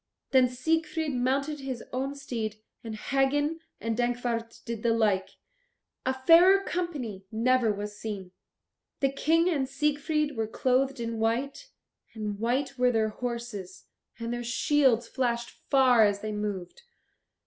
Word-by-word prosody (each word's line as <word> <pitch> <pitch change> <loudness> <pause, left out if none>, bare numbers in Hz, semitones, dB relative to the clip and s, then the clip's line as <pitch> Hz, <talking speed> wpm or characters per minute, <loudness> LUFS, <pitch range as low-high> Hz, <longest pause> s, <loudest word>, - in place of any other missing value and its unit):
Then 255 -2 +5
Siegfried 315 +3 -1
mounted 275 +4 0
his 260 -4 -5
own 270 +2 -2
steed, 230 -6 -4 0.3
and 225 -2 -5
Hagen 285 +6 +1 0.2
and 225 0 -2
Dankwart 240 -1 -2
did 230 -2 -4
the 230 0 +2
like. 205 -4 +2 0.8
A 260 - +3
fairer 365 +5 +7
company 265 - -4
never 235 +1 +3
was 205 0 -5
seen. 200 -4 -5 0.7
The 275 -1 +2
King 325 +5 +2
and 280 -7 0
Siegfried 300 +1 0
were 225 -1 -1
clothed 260 +3 +1
in 230 -1 -3
white, 260 - -1 0.5
and 210 -2 -4
white 260 +4 -1
were 250 0 +4
their 220 -2 +1
horses, 225 -5 -6 0.3
and 230 0 -4
their 240 0 -3
shields 250 -1 +2
flashed 235 -2 -1 0.2
far 255 -4 +6
as 205 -1 +2
they 215 - -3
moved. 210 - -4
245 Hz, 135 wpm, -28 LUFS, 225-275 Hz, 0.8 s, fairer